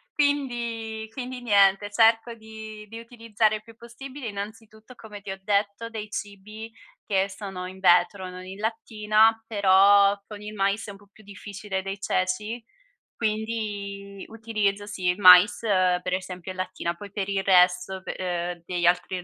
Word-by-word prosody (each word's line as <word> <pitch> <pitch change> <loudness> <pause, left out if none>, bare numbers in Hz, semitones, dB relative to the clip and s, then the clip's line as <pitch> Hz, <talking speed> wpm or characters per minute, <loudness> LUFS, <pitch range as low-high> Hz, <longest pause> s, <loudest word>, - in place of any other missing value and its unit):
quindi 235 -6 -1
quindi 250 0 -6
niente, 200 -2 +4
cerco 225 +1 +3
di 220 -1 -10
di 225 +1 -8
utilizzare 230 -2 -1
il 215 - -8
più 225 0 -16
possibile, 255 +3 -9
innanzitutto 215 +3 -9
come 210 -3 -11
ti 195 - -7
ho 195 - -7
detto 205 +2 -1
dei 215 -2 -7
cibi 210 +2 -7 0.4
che 195 -1 +1
sono 190 -2 -7
in 190 +1 -11
vetro, 185 +1 +3
non 185 0 -9
in 190 +2 -9
lattina, 220 0 +2
però 200 -1 +5
con 210 -1 -9
il 210 0 -8
mais 200 +1 0
è - - -6
un 195 - -12
po' 205 0 -21
più 215 -1 -19
difficile 200 -1 -6
dei 195 +1 -6
ceci, 210 +6 -1 0.5
quindi 205 -3 -4
utilizzo, 215 -3 -2
sì, 185 -3 -4
il 180 +2 +2
mais, 180 +1 +8
uhm, 185 -4 +2
per 180 0 -3
esempio 185 -1 -5
in 185 - -10
lattina, 185 -2 -3
poi 200 +4 -11
per 200 -1 -3
il 195 -1 0
resto, 180 0 +3
pe - - -4
ehm, 175 -1 -4
degli 175 -1 -2
altri 180 +1 +1
205 Hz, 165 wpm, -25 LUFS, 190-220 Hz, 0.5 s, mais